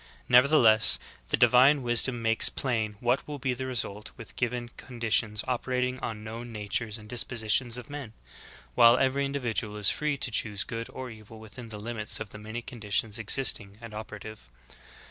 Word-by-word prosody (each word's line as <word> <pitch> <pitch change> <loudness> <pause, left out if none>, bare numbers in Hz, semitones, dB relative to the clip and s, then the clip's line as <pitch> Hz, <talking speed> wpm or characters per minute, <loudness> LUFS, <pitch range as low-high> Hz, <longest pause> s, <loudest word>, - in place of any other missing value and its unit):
Nevertheless, 125 -4 +6 0.3
the - - +1
divine 130 +4 +5
wisdom 120 0 +2
makes 115 0 +4
plain 110 -5 -2
what 125 +2 0
will 150 -1 -5
be 130 -1 -1
the 130 +1 -5
result 105 -5 -3
with 115 - -11
given 120 -1 -2
con 120 0 -12
ditions 110 -1 +1
operating 125 0 -1
on 105 -1 -5
known 115 +2 -7
natures 105 +1 -2
and 105 -1 -13
dispositions 120 0 0
of 125 - -8
men; 145 -6 -8 0.6
while 115 - +7
every 135 +2 +1
individual 120 -6 -3
is 105 -2 +3
free 150 -2 -1
to 130 - -2
choose 105 -2 0
good 115 -1 -6
or 130 -2 -7
evil 110 0 -13
within 110 +2 -10
the 105 - -6
limits 110 0 -3
of 110 -2 -7
the 105 - -10
many 110 +3 -7
conditions 110 -1 -3
existing 105 -3 0
and 115 -2 -10
operative. 105 - -9
115 Hz, 170 wpm, -28 LUFS, 110-125 Hz, 0.6 s, while